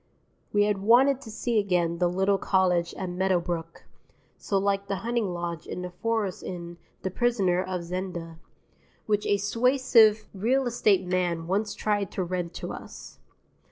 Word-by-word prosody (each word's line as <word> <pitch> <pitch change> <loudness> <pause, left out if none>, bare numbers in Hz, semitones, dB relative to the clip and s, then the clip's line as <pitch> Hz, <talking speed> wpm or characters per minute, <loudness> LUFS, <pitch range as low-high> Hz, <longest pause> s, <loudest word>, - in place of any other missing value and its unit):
We 205 0 +3
had 205 -1 +1
wanted 250 +6 +4
to 225 - -10
see 225 +1 0
again 175 -4 0
the 175 -1 +3
little 190 +2 +1
cottage 180 -3 +1
at 190 - -4
Meadowbrook 175 -2 -2 0.5
(so 200 - -2
like 200 0 0
the 200 - -1
hunting 235 -2 0
lodge 170 -1 -5
in 180 - -5
the 180 - -5
forest 210 0 -2
in 175 -1 -7 0.2
"The 190 - -2
Prisoner 195 -6 +1
of 185 -2 -4
Zenda") 170 -2 -5 0.7
which 210 -1 0
a 205 - +3
suasive 225 0 +4
real 245 +7 +1
estate 210 -6 +2
man 175 -2 -1
once 205 +4 -1
tried 205 -3 0
to 190 - -1
rent 175 -1 -3
to - - -5
us. - - -10
190 Hz, 155 wpm, -27 LUFS, 175-215 Hz, 0.7 s, wanted